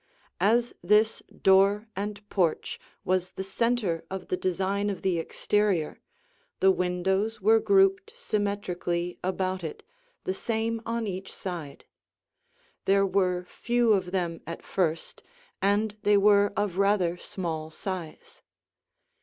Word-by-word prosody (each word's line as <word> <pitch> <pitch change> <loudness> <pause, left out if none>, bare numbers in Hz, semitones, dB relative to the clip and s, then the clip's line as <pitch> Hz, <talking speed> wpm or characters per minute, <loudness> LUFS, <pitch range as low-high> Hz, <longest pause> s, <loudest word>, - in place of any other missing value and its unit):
As 235 +4 +3
this 210 +4 +3 0.2
door 195 +3 +5
and 205 +1 -5
porch 175 -6 0 0.3
was 185 0 0
the 190 - -4
center 200 -3 0
of 190 0 -6
the - - +1
design 195 +3 -1
of 195 -3 -5
the 180 -3 +1
exterior, 195 -1 0 0.6
the 190 - +6
windows 190 +4 0
were 220 +3 +5
grouped 390 - +3
symmetrically 185 - -2
about 185 0 -1
it, 160 - -6 0.4
the 185 - -1
same 225 +2 -2
on 230 0 -1
each 190 -1 -5
side. 170 -7 -6 1.0
There 195 0 +4
were 180 -2 +1
few 240 +1 +2
of 185 -3 0
them 175 -3 -2
at 170 - -6
first, 165 -4 -2 0.4
and 205 +2 +1
they 205 0 +4
were 205 0 +5
of 200 -3 -1
rather 195 -4 +3
small 160 -4 -4
size. 170 0 -7
195 Hz, 125 wpm, -27 LUFS, 180-210 Hz, 1.0 s, the